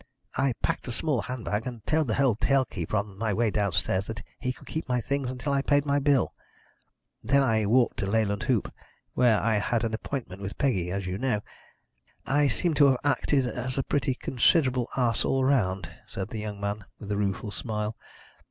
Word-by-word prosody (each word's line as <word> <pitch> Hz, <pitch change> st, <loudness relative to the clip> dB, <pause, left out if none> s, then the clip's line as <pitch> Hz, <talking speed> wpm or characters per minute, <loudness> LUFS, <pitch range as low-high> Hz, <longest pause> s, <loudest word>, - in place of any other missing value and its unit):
I 135 Hz, -2 st, +2 dB
packed -, -, -1 dB
a -, -, -2 dB
small 135 Hz, -1 st, 0 dB
handbag, 115 Hz, -2 st, -3 dB
and 120 Hz, -4 st, -7 dB
told 155 Hz, -2 st, +2 dB
the 110 Hz, -, 0 dB
hotel 135 Hz, +1 st, +3 dB
keeper 90 Hz, -1 st, -3 dB
on 100 Hz, -1 st, -4 dB
my 110 Hz, -1 st, 0 dB
way 115 Hz, 0 st, +2 dB
downstairs 95 Hz, -1 st, 0 dB
that 110 Hz, -3 st, -6 dB, 0.2 s
he 125 Hz, -, -1 dB
could -, -, -12 dB
keep 160 Hz, -4 st, -5 dB
my 125 Hz, 0 st, +2 dB
things 135 Hz, +3 st, -1 dB
until 130 Hz, +3 st, -2 dB
I 140 Hz, -, +2 dB
paid 145 Hz, +1 st, +2 dB
my 140 Hz, 0 st, +2 dB
bill. 140 Hz, -2 st, +2 dB, 0.9 s
Then 140 Hz, +4 st, +4 dB
I 110 Hz, -4 st, +2 dB
walked 120 Hz, +3 st, +3 dB
to 105 Hz, -5 st, -1 dB
Leyland 100 Hz, -1 st, +1 dB
Hoop, 120 Hz, -6 st, +1 dB, 0.4 s
where 120 Hz, -4 st, +4 dB
I 110 Hz, -1 st, +2 dB
had 115 Hz, +2 st, 0 dB
an 115 Hz, -1 st, -1 dB
appointment 110 Hz, -5 st, -4 dB
with 100 Hz, +1 st, -5 dB
Peggy, 95 Hz, -11 st, +1 dB
as 100 Hz, +1 st, -3 dB
you 90 Hz, +2 st, -3 dB
know. 125 Hz, -6 st, 0 dB, 0.8 s
I 145 Hz, +1 st, +3 dB
seem 150 Hz, +8 st, +1 dB
to 140 Hz, -, +8 dB
have 130 Hz, -2 st, +4 dB
acted 145 Hz, -1 st, +2 dB
as 125 Hz, +2 st, -3 dB
a 135 Hz, -, +1 dB
pretty 140 Hz, -1 st, 0 dB
considerable 130 Hz, -1 st, +2 dB
ass 120 Hz, -3 st, +2 dB
all 135 Hz, -1 st, +1 dB
round," 100 Hz, -9 st, +1 dB, 0.2 s
said 95 Hz, +1 st, -5 dB
the 110 Hz, -, -5 dB
young 105 Hz, -1 st, -5 dB
man, 100 Hz, 0 st, -3 dB
with 105 Hz, -1 st, -7 dB
a -, -, +1 dB
rueful 100 Hz, +1 st, -1 dB
smile. 105 Hz, -1 st, -3 dB
115 Hz, 200 wpm, -27 LUFS, 105-135 Hz, 0.9 s, to